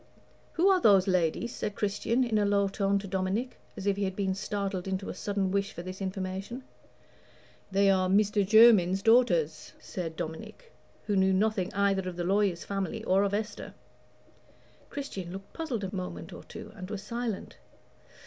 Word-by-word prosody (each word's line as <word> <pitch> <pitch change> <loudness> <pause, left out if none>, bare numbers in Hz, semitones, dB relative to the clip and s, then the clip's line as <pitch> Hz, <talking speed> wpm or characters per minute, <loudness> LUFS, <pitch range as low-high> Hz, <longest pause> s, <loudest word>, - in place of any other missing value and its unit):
"Who 345 +4 +3
are 380 -2 +4
those 200 - +5
ladies?" 185 +5 +1
said 210 - -4
Christian, 210 +4 0
in 225 -3 +1
a - - +2
low 200 0 +2
tone, 195 0 +1
to 200 0 -5
Dominic, 190 +7 -2 0.2
as 195 - -6
if 200 -1 +1
he 200 - -1
had 190 -1 -3
been 195 -1 0
startled 195 -1 -3
into 190 0 -3
a - - -3
sudden 195 0 -2
wish 200 +1 -1
for 170 - -7
this 185 +2 -7
information. 190 +5 -4 1.1
"They 200 +1 +3
are 185 -1 +2
Meester 205 +1 +3
Jermyn's 195 -3 +6
daughters," 180 -10 +3
said 165 -3 -5
Dominic, 160 - -7 0.3
who 205 - 0
knew 190 0 +3
nothing 195 -1 +1
either 195 -2 +1
of 180 - -8
the 175 - -3
lawyer's 195 -1 +1
family 200 +2 -3
or 190 -2 +3
of 200 0 +1
Esther. 210 +1 -5 1.1
Christian 195 -11 -6
looked 195 +1 -9
puzzled 275 -10 -3
a 195 +1 -4
moment 185 -1 -6
or - - -10
two, - - -10
and 185 -3 -8
was 205 -2 -5
silent. 235 -3 -4
195 Hz, 175 wpm, -29 LUFS, 185-210 Hz, 1.1 s, Jermyn's